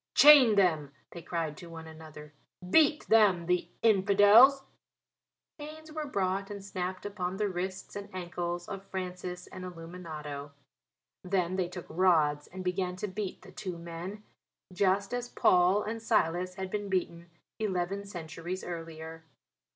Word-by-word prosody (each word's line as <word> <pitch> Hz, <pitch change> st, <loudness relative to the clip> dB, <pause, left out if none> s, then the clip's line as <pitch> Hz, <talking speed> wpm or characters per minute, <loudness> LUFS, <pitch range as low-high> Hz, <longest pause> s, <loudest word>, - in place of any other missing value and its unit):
"Chain 280 Hz, -7 st, +9 dB
them," 160 Hz, -8 st, +2 dB, 0.2 s
they 170 Hz, -, -8 dB
cried 165 Hz, -2 st, -3 dB
to 175 Hz, -, -10 dB
one 165 Hz, -1 st, -9 dB
another. 155 Hz, -2 st, -12 dB, 0.3 s
"Beat 300 Hz, -, +4 dB
them 200 Hz, -6 st, +4 dB
the 180 Hz, 0 st, 0 dB
infidels." 215 Hz, +6 st, +6 dB, 1.0 s
Chains 310 Hz, +1 st, -9 dB
were 310 Hz, -1 st, -4 dB
brought 195 Hz, -4 st, -1 dB
and 200 Hz, -1 st, -7 dB
snapped 185 Hz, -1 st, -4 dB
upon 190 Hz, -2 st, -3 dB
the 210 Hz, 0 st, 0 dB
wrists 185 Hz, 0 st, -5 dB
and 200 Hz, 0 st, -6 dB
ankles 175 Hz, -1 st, -4 dB
of 195 Hz, -1 st, -6 dB
Francis 180 Hz, -2 st, -6 dB
and 185 Hz, -, -10 dB
Illuminato. 165 Hz, -5 st, -8 dB, 0.7 s
Then 185 Hz, -1 st, 0 dB
they 185 Hz, -2 st, 0 dB
took 180 Hz, 0 st, -8 dB
rods 155 Hz, -5 st, +2 dB
and 185 Hz, +1 st, -8 dB
began 180 Hz, 0 st, -1 dB
to 195 Hz, +3 st, -4 dB
beat 200 Hz, 0 st, -5 dB
the 185 Hz, -, -13 dB
two 185 Hz, -2 st, -6 dB
men 170 Hz, +5 st, -7 dB, 0.5 s
just 195 Hz, +3 st, +1 dB
as 245 Hz, 0 st, -3 dB
Paul 180 Hz, +3 st, +3 dB
and 225 Hz, +1 st, -4 dB
Silas 180 Hz, -3 st, +1 dB
had 190 Hz, -1 st, -5 dB
been 205 Hz, -1 st, -3 dB
beaten 170 Hz, -2 st, -2 dB, 0.3 s
eleven 195 Hz, -1 st, -1 dB
centuries 175 Hz, -1 st, -6 dB
earlier. 165 Hz, -1 st, -7 dB
185 Hz, 145 wpm, -30 LUFS, 170-200 Hz, 1.0 s, Chain